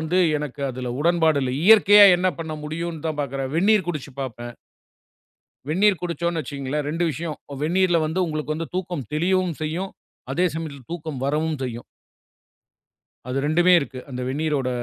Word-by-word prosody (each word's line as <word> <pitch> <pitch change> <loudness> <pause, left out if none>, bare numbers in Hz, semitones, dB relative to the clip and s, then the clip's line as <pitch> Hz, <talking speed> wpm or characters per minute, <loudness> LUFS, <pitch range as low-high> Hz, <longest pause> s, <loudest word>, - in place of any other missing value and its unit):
வந்து 160 +4 0 0.2
எனக்கு 145 -1 -5
அதுல 125 0 -5
உடன்பாடு 160 -2 +3
இல்ல. 130 - -1
இயற்கையா 205 0 +8
என்ன 185 +1 +1
பண்ண 160 -1 -5
முடியும்னு 165 +1 -5
தான் 155 -2 -3
பாக்குறேன். 135 -1 -3
வெந்நீர் 195 +1 +3
குடிச்சு 150 -4 -4
பாப்பேன். 120 -2 -6 1.2
வெந்நீர் 190 +2 +3
குடிச்சோம்னு 170 -1 -2
வச்சுக்கோங்களேன், 140 +1 -4
2 165 +3 -1
விஷயம். 160 0 -5 0.3
வெந்நீரில 175 +1 +2
வந்து 170 +4 -1
உங்களுக்கு 155 -1 -3
வந்து 165 +1 -5
தூக்கம் 175 - -4
தெளியவும் 180 +1 +1
செய்யும். 175 +5 -3 0.4
அதே 180 +5 +2
சமயத்துல 145 -5 -6
தூக்கம் 155 -6 -5
வரவும் 155 +1 0
செய்யும். 120 -2 -5 1.4
அது 130 - -1
2 175 +4 +4
இருக்கு. 135 -2 -6
அந்த 125 0 -5
வெந்நீரோட 145 -2 -1
160 Hz, 145 wpm, -23 LUFS, 140-175 Hz, 1.4 s, இயற்கையா